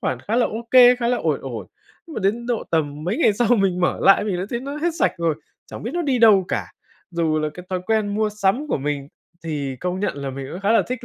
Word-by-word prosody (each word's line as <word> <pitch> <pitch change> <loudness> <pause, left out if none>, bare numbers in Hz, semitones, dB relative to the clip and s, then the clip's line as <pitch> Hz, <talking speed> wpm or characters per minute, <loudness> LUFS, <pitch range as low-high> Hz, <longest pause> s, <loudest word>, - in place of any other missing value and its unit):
khoản 125 - -2
khá 220 - -2
là 245 - +3
ô 230 +2 -7
kê, 250 -1 +8
khá 235 -1 -1
là 245 - +2
ổn - - -1
ổn, - - -6 0.4
nhưng 320 - -10
mà - - -3
đến 225 +5 0
độ 240 -2 -1
tầm 150 -2 -1
mấy 195 +7 -1
ngày 275 - +4
sau 225 +2 0
mình 190 -3 +1
mở 180 - +1
lại 195 +1 +5
mình 195 -4 -1
đã 185 - -3
thấy 235 -1 -2
nó 280 +2 -6
hết 340 +3 0
sạch - - +3
rồi, 165 -2 +1 0.3
chẳng - - -9
biết 235 - -4
nó 350 - 0
đi 270 -5 +1
đâu 210 -5 +6
cả. - - -3 0.4
Dù 165 -2 0
là 155 0 -1
cái 180 0 -10
thói 185 -1 -1
quen 215 -2 0
mua 215 0 +1
sắm 210 +8 0
của - - 0
mình 140 0 -3 0.4
thì 145 -5 -3
công 180 +6 -3
nhận 205 - -1
là 140 -1 -4
mình 135 0 -6
cũng 180 - -6
khá 205 +3 +2
là - - +4
thích 250 -1 -4
200 Hz, 275 wpm, -22 LUFS, 165-235 Hz, 0.4 s, kê